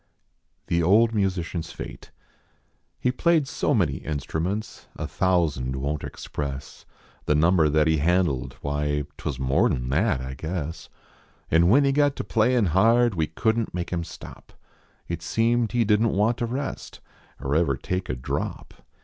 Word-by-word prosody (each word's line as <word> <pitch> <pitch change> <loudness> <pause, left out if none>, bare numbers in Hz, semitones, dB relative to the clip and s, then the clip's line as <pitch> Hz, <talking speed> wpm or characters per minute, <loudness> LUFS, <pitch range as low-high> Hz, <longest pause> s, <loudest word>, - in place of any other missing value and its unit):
THt 85 0 +1
01. 100 +7 +6
1) - - -5
MUSICIAN 90 -3 -1
S 85 +1 -7
HATH - - -8 1.0
lie 125 - +4
played 160 +1 +2
so 145 -1 0
many 85 - +1
instruments 80 +9 -4
A - - -4
thousand 80 -9 0
won 70 +3 -2
t - - -6
express 70 -2 -6 0.4
The 75 - +2
number 80 0 +4
that 75 +1 +3
he 80 -1 +3
handled 80 -4 +1
why 75 0 -1
Twas 70 - -4
nior 65 +1 +2
n 60 0 -2
that, 85 - +2
I 65 +1 -5
guess; 80 +2 -5 0.6
An" 85 +2 +5
when 140 +7 +6
he 140 - +3
got 145 0 +2
to - - -4
playin 115 0 +2
hard 115 +4 +4
\Ye 80 -2 0
couldn 115 0 0
t - - -17
make 90 0 -3
im 85 -1 -1
stop; - - -12 0.5
It 85 -1 -4
seemed 115 +5 +1
he 120 -2 +2
didn 105 +2 +3
t - - -2
want 110 +4 +2
to 120 - -1
rest 135 +4 -5 0.4
Er 70 - -2
ever 75 -5 +2
take 90 +6 -3
a 65 - -1
drop. 60 - -4
85 Hz, 170 wpm, -25 LUFS, 75-115 Hz, 1.0 s, 01